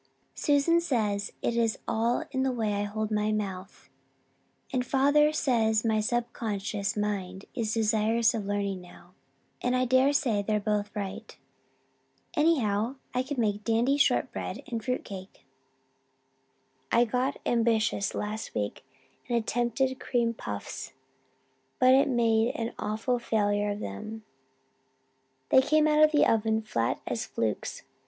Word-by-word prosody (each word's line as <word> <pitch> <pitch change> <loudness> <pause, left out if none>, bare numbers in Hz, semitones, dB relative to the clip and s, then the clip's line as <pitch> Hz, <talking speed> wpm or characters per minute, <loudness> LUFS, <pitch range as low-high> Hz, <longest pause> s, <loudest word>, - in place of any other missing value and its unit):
Susan 295 +4 +3
says 215 -10 -1
it 235 - 0
is 230 -2 +1
all 230 +6 +1
in 260 -1 -1
the 265 0 +1
way 220 -4 -1
I 205 0 -1
hold 215 +1 -3
my 210 0 +1
mouth 195 -2 -4 0.9
and 255 -1 +1
father 285 +4 +4
says 230 -7 +1
my 220 -1 +2
subconscious 215 -3 -2
mind 195 -2 -3
is 225 -3 -2
desirous 225 +2 +2
of 215 -4 -3
learning 200 -2 -2
now, 180 0 -16 0.5
and 250 0 +1
I 255 0 +2
dare 260 +3 +4
say 245 -8 +1
they're 210 +1 0
both 205 0 -1
right. 205 +2 -6 1.0
Anyhow, 255 -7 +2 0.2
I 250 - +1
can 265 0 -4
make 210 -2 0
dandy 235 +5 +2
short 285 - +2
bread - - -5
and 230 -2 -4
fruitcake. 200 -6 -5 1.5
I 235 +1 +5
got 250 +5 -1
ambitious 225 -3 +1
last 215 +1 -4
week 105 0 -3 0.5
and 240 - +2
attempted 240 +3 0
cream 235 -2 0
puffs, 100 - -6 0.8
but 260 +2 +5
made 230 -2 +2
an 230 0 -3
awful 220 +4 -1
failure 205 -3 +1
of 205 0 -3
them. 215 - -6 1.3
They 260 - +7
came 305 +3 +3
out 305 0 +5
of 310 - +6
the 300 - +4
oven 220 0 +2
flat 115 - -1
as 120 - -3
flukes. 110 -2 -3
225 Hz, 135 wpm, -28 LUFS, 210-250 Hz, 1.5 s, They